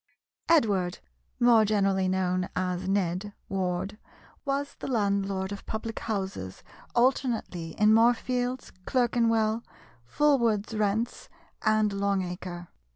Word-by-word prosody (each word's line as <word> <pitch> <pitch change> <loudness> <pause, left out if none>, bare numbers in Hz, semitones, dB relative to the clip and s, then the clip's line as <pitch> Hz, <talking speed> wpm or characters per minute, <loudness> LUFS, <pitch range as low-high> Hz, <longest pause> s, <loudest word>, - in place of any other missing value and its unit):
Edward 200 - +3 0.4
(more 240 -2 +6
generally 195 -3 +2
known 185 -1 0
as 185 0 -1
Ned) 195 +1 -1 0.2
Ward 190 +2 -2 0.5
was 280 +1 -1
the - - -5
landlord 200 -5 0
of 200 - -7
public 220 +1 -4
houses 190 - -4 0.3
alternately 235 -9 0
in 215 +1 +5
Moorfields, 245 +2 +2 0.2
Clerkenwell, 230 -3 +2 0.4
Fulwood's 230 - +2
Rents, 215 +3 -1 0.3
and 215 -1 +2
Long 200 -1 0
Acre. 175 -1 -6
205 Hz, 100 wpm, -28 LUFS, 190-230 Hz, 0.5 s, more